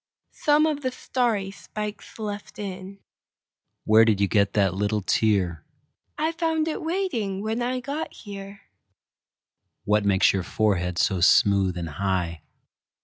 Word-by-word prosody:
Some 300 0 +3
of 300 -2 -1
the 260 - 0
starry 235 -6 -1
spikes 210 +1 -7
left 210 -2 -6
in. 195 -1 -7 0.8
Where 110 +1 +6
did 110 -3 +2
you 100 - +3
get 100 0 +2
that 100 -4 +2
little 105 +1 -1
tear?I 105 - -2
found 325 -1 0
it 315 - -3
waiting 315 - -2
when 220 +2 -2
I 250 +1 -1
got 285 +5 -4
here. 200 -1 -10 1.2
What 105 0 +2
makes 100 -2 +4
your 95 - 0
forehead 90 -3 0
so 95 0 +1
smooth 95 0 +4
and 85 -1 -3
high? 85 -1 -2
190 Hz, 135 wpm, -25 LUFS, -, 1.2 s, Where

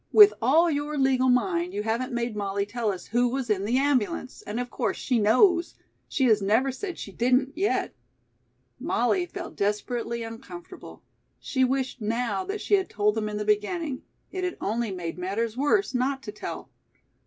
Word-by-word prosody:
"With 420 -1 +9
all 320 +8 +4
your 295 +1 -2
legal 260 -1 +3
mind 345 +7 +1
you 210 - -1
haven't 230 +4 -1
made 240 -2 -2
Molly 200 -1 -1
tell 220 0 -1
us 185 - -7
who 240 +2 +1
was 255 -2 -2
in 200 -1 0
the 240 +4 +1
ambulance, 260 -3 0
and 210 +3 -3
of 245 0 -4
course - - -1
she 250 -3 0
knows. 340 - +4 0.3
She 265 - +1
has 215 -4 +4
never 225 +7 +2
said 360 +7 -6
she 200 - -7
didn't, 255 +6 +1
yet." 390 +4 0 0.9
Molly 360 -2 +1
felt 350 -2 -7
desperately 230 +3 -2
uncomfortable. 260 +10 -10 0.4
She 260 -1 0
wished 260 -1 -1
now 235 - -1
that 405 +2 -4
she - - -2
had 385 -2 +3
told 210 0 +1
them 215 -1 -2
in 210 - -4
the 210 - -3
beginning. 255 - 0 0.3
It 375 -1 -4
had 360 -1 -2
only 225 +2 -1
made 180 -3 -5
matters 215 +5 -2
worse 290 - +1
not 265 +2 0
to 210 - -6
tell. 210 - -7
245 Hz, 180 wpm, -26 LUFS, 215-290 Hz, 0.9 s, With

